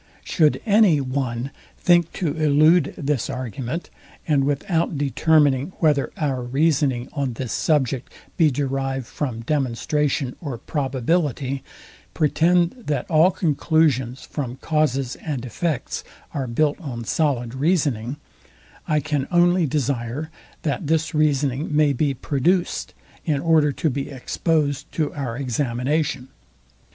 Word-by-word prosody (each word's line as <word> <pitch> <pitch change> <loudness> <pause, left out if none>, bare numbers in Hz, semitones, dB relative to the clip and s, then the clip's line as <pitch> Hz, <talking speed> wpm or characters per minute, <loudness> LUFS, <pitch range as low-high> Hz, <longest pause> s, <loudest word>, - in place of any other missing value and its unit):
Should 155 -4 +2
any 205 -7 +5
one 130 -1 -2 0.3
think 175 -2 +3
to 175 - -1
elude 155 +2 +4
this 140 -4 -1
argument; 130 - -4 0.4
and 145 -4 +3
without 160 +3 0
determining 145 +1 +2
whether 150 -4 +2
our 135 -5 -1
reasoning 135 -1 +1
on 140 -3 -1
this 120 0 -4
subject 135 -5 0 0.2
be 165 -4 +4
derived 135 -1 -2
from 120 -3 -4
demonstration 135 +1 -1
or 140 -7 -4
probability, 135 0 -1 0.5
pretend 170 +3 +3 0.2
that 145 -4 -1
all 160 +3 +6
conclusions 150 -7 +1
from 130 -5 -5
causes 135 -4 0
and 135 -6 -4
effects 145 +4 -3 0.3
are 135 -3 -2
built 145 +7 0
on 125 -7 -5
solid 125 -3 0
reasoning: 140 -4 0 0.7
I 150 -1 +2
can 145 -1 -1
only 175 -1 +3
desire, 140 +1 -2 0.3
that 150 +1 -2
this 160 +1 +1
reasoning 150 -1 +1
may 150 -2 +4
be 140 +1 0
produced, 160 +8 0 0.3
in 150 -4 0
order 155 -1 +3
to 160 - 0
be 135 +1 -3
exposed 145 +1 -1
to 155 -3 -1
our 125 -5 -4
examination. 135 +2 -1
145 Hz, 120 wpm, -22 LUFS, 130-155 Hz, 0.7 s, all